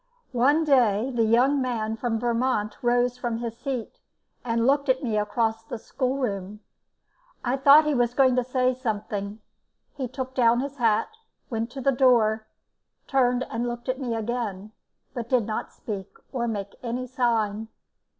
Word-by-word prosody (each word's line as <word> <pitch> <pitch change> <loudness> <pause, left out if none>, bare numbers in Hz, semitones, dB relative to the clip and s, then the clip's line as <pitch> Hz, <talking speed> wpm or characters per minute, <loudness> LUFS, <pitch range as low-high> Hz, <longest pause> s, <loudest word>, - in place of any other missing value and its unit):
One 280 +6 +3
day 250 -5 +3
the 230 -2 +2
young 255 +5 +3
man 225 -4 -1
from 225 -1 -2
Vermont 235 -3 0
rose 245 0 +1
from 240 -2 -2
his 230 -1 -4
seat 250 -1 -5 0.4
and 230 -1 0
looked 280 +1 +2
at 260 +2 +2
me 225 -4 -1
across 220 +2 0
the 225 - -6
schoolroom. 220 -6 -3 0.8
I 245 +2 +1
thought 280 +3 +7
he 300 - +1
was 245 -2 +1
going 260 -2 +4
to 250 - +3
say 255 0 +1
something. 210 -4 -4 0.5
He 265 -3 -3
took 260 +1 -6
down 240 -1 +3
his 280 +1 -5
hat, 225 -3 +2 0.4
went 225 0 -2
to 270 - -6
the 275 - +3
door, 230 -4 +3 0.6
turned 250 -2 +2
and 235 +2 -2
looked 240 +1 -5
at 255 +1 -1
me 245 -4 -2
again, 215 -3 -3 0.4
but 235 -2 -5
he 255 - +4
did 230 - -2
not 215 0 -4
speak 200 -3 -6 0.2
or 240 -3 -1
make 200 -3 -4
any 245 +1 -3
sign. 225 -4 0
240 Hz, 165 wpm, -25 LUFS, 220-255 Hz, 0.8 s, thought